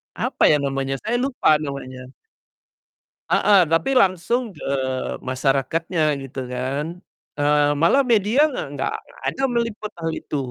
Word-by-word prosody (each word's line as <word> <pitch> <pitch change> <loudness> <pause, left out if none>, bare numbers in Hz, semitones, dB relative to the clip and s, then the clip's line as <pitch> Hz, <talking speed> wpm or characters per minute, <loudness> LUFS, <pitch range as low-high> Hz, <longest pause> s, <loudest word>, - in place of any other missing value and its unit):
apa - - +1
ya 150 - +4
namanya, 135 -1 -2
saya 235 +3 0
lupa 250 - +2
namanya. 130 -3 -6 1.2
Heeh, 190 -5 +4
tapi 165 - +1
langsung 210 0 +1
ke - - -11 0.6
masyarakatnya 135 +6 -1 0.2
gitu 135 0 -7
kan. 130 +4 -3 0.5
Eee, 145 0 +3
malah 170 - +4
media 220 +3 +2 0.2
gak - - -4
gak 135 - -1 0.2
gak - - -18
ada 270 - -3
meliput 230 -3 -2
hal 165 0 -2
itu. 150 - -5
155 Hz, 130 wpm, -22 LUFS, 135-215 Hz, 1.2 s, ya